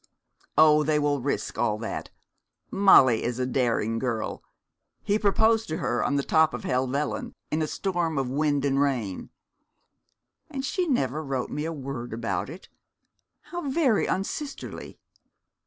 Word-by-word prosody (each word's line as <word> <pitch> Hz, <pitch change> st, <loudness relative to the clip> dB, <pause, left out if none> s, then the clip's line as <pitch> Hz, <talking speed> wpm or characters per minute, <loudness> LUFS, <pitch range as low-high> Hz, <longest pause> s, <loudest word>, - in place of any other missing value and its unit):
'Oh, 155 Hz, -1 st, +7 dB
they 150 Hz, 0 st, +2 dB
will 145 Hz, -2 st, +1 dB
risk 140 Hz, +3 st, -2 dB
all 105 Hz, -3 st, +1 dB
that. 115 Hz, +1 st, -5 dB, 0.6 s
Molly 135 Hz, -, +6 dB
is 120 Hz, 0 st, -2 dB
a 130 Hz, -, 0 dB
daring 115 Hz, -3 st, 0 dB
girl. 115 Hz, -4 st, -3 dB, 0.6 s
He 205 Hz, +1 st, +1 dB
proposed 220 Hz, +2 st, +3 dB
to 160 Hz, -, -3 dB
her 120 Hz, -, -1 dB
on 140 Hz, -, 0 dB
the 140 Hz, -, +1 dB
top 160 Hz, -2 st, +3 dB
of 125 Hz, -, -7 dB
Helvellyn, 130 Hz, +3 st, -1 dB, 0.2 s
in 155 Hz, -, 0 dB
a 155 Hz, -, 0 dB
storm 175 Hz, -3 st, -1 dB
of 135 Hz, -2 st, 0 dB
wind 145 Hz, +1 st, 0 dB
and 135 Hz, 0 st, +2 dB
rain.' 120 Hz, -10 st, -1 dB, 1.2 s
'And 275 Hz, -3 st, -4 dB
she 360 Hz, +5 st, -1 dB
never 155 Hz, -, 0 dB
wrote 135 Hz, -3 st, -3 dB
me 150 Hz, +1 st, -3 dB
a 165 Hz, -, -2 dB
word 135 Hz, -6 st, -6 dB
about 115 Hz, +3 st, -2 dB
it. 170 Hz, +5 st, -10 dB, 0.7 s
How 345 Hz, -5 st, -5 dB
very 265 Hz, -6 st, +2 dB
unsisterly!' 275 Hz, +10 st, -4 dB
145 Hz, 150 wpm, -26 LUFS, 125-190 Hz, 1.2 s, Oh